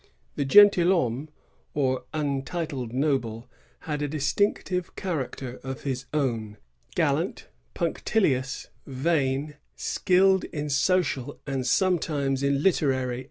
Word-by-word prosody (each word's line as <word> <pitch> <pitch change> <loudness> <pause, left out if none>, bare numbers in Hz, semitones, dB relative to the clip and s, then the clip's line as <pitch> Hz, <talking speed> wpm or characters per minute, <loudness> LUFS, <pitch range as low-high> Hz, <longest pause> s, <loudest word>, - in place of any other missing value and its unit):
The 140 - -1
gentiihomme^ 170 - +5 0.5
or 130 -3 0
untitled 140 -3 -3
noble, 125 -4 -1 0.3
had 150 -2 -3
a 145 - 0
distinctive 180 +5 -1
character 135 -7 -4
of 130 0 -6
his 135 -2 -3
own, 115 -8 -1 0.2
— - - -27
gallant, - - 0 0.3
punctilious, 155 -6 0 0.2
vain; 140 +1 0 0.2
skilled 190 +1 +2
in 150 -1 -4
social 145 -3 +1
and 135 -3 -2
sometimes 145 -4 +1
in 140 +1 +1
literary 130 -8 +1
140 Hz, 105 wpm, -26 LUFS, 130-165 Hz, 0.5 s, gentiihomme^